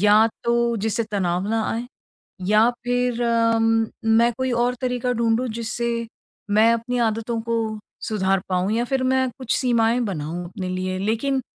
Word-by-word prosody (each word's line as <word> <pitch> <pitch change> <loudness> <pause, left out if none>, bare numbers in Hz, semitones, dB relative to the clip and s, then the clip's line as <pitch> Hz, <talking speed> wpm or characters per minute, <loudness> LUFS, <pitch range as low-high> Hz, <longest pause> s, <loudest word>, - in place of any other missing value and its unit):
या 210 +2 +6 0.2
तो 235 0 +2
जिससे 220 +2 0
तनाव 185 -1 -1
ना 225 0 +1
आए 235 +2 -3 0.6
या 215 +3 +5 0.2
फिर 245 -1 0
अम, 225 -1 +2 0.2
मैं 225 +2 +4
कोई 260 -1 0
और 240 +1 +1
तरीका 250 -1 -1
ढूँढूँ 235 +1 +1
जिससे 235 +1 -1 0.5
मैं 220 +3 +5
अपनी 230 +2 -1
आदतों 225 +1 -3
को 230 0 -1 0.5
सुधार 195 -3 +1
पाऊँ 185 +2 0
या 235 +2 +1
फिर 265 +1 -1
मैं 260 0 +2
कुछ 255 -3 -1
सीमाएँ 235 -1 +2
बनाऊँ 175 -3 -4
अपने 185 +1 -6
लिए, 185 0 -2
लेकिन 230 +7 0
230 Hz, 155 wpm, -23 LUFS, 210-240 Hz, 0.6 s, या